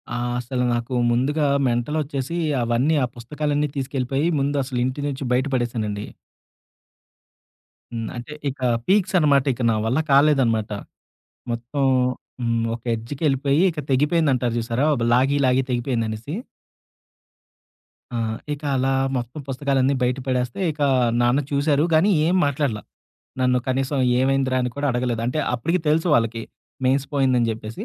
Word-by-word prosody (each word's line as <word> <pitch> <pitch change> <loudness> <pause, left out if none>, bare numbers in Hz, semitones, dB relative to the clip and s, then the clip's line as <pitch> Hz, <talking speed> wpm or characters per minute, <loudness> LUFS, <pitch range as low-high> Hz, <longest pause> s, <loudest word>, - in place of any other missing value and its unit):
ఆ! - - -1 0.2
అసలు 125 +1 -2
నాకు 120 +2 -2 0.2
ముందుగా 145 +6 +1 0.2
మెంటలొచ్చేసి 140 +5 -2 0.3
అవన్నీ, 120 +7 +1
ఆ - - +3
పుస్తకాలన్నీ 145 +4 -2
తీసుకెళ్ళిపోయి 135 +2 -1
ముందు 140 +1 0
అసలు 130 -2 -4
ఇంటి 130 +3 -3
నుంచి 140 -1 -4
బయట 130 +3 +1
పడేశానండి. 110 -4 -2 1.9
హ్మ్. 115 -2 -4
అంటే 120 +5 -7 0.2
ఇక 135 - -8 0.3
పీక్స్ 190 -1 +2
అనమాట. 140 -4 +4
ఇక 125 - -8
నా - - +1
వల్ల 125 +7 +1
కాలేదనమాట. 135 -7 +3 0.8
మొత్తం 120 +4 -3 0.6
హ్మ్. 115 -1 0
ఒక 120 - -12
ఎడ్జ్‌కెళ్ళిలిపోయి, 140 +5 0
ఇక 160 - -6
తెగిపోయిందంటారు 135 -3 +2
చూసారా? 115 +4 -1 0.2
బ్లా 115 - +1
లాగి 135 +3 +2
లాగి 130 +1 +3
తెగిపోయిందనేసి. 120 0 -2 1.8
ఆ! - - -5 0.4
ఇక 145 +1 -9
అలా 135 +1 +1 0.2
మొత్తం 125 +4 -5
పుస్తకాలన్నీ 135 0 +1
బయట 125 +1 +1
పడేస్తే, 125 +1 -1
ఇక 150 0 -9 0.4
నాన్న 120 +3 +3
చూసారు 145 +1 +2
గానీ, 160 +6 +4 0.2
ఏం 180 - +2
మాట్లాడల. 140 -6 -1 0.6
నన్ను 125 0 +3
కనీసం 135 +2 0 0.2
ఏమైందిరా 135 0 +1
అని 125 - -1
కూడా 145 0 -1
అడగలేదు. 120 -2 -1
అంటే 125 +5 -1 0.2
అప్పటికి 165 +9 0
తెలుసు 160 +3 +2
వాళ్ళకి 115 -2 +1 0.4
మెయిన్స్ 135 +2 +2
పోయిందని 130 -4 +2
చెప్పేసి. 110 0 -7
130 Hz, 130 wpm, -22 LUFS, 120-145 Hz, 1.9 s, అనమాట